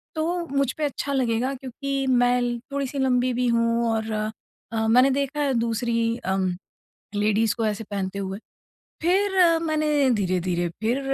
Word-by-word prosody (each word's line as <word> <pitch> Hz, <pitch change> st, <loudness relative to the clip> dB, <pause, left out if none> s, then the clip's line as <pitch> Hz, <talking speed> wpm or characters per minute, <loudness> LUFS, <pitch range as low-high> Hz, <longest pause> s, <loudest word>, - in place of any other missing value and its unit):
तो 340 Hz, +2 st, -1 dB
मुझ 275 Hz, -2 st, 0 dB
पे 310 Hz, -, -2 dB
अच्छा 280 Hz, 0 st, -3 dB
लगेगा 255 Hz, 0 st, 0 dB
क्योंकि 270 Hz, +1 st, -3 dB
मैं 245 Hz, -1 st, +3 dB
ल 240 Hz, -1 st, -1 dB
थोड़ी-सी 280 Hz, 0 st, -2 dB
लम्बी 255 Hz, -1 st, +2 dB
भी 250 Hz, +1 st, 0 dB
हूँ 230 Hz, 0 st, +2 dB
और 220 Hz, 0 st, -2 dB
अ, 220 Hz, +1 st, -4 dB
मैंने 250 Hz, +4 st, +5 dB
देखा 280 Hz, +2 st, -1 dB
है 280 Hz, -2 st, +1 dB
दूसरी 230 Hz, 0 st, 0 dB
अम 190 Hz, -2 st, -1 dB, 0.7 s
लेडीज़ 210 Hz, +1 st, +2 dB
को 225 Hz, -, 0 dB
ऐसे 215 Hz, +1 st, -2 dB
पहनते 195 Hz, -1 st, -3 dB
हुए। 195 Hz, 0 st, -4 dB, 0.6 s
फिर 365 Hz, -1 st, +3 dB
मैंने 300 Hz, -3 st, +2 dB
धीरे-धीरे 185 Hz, -5 st, 0 dB
फिर 235 Hz, +5 st, +1 dB
245 Hz, 150 wpm, -24 LUFS, 220-275 Hz, 0.7 s, मैंने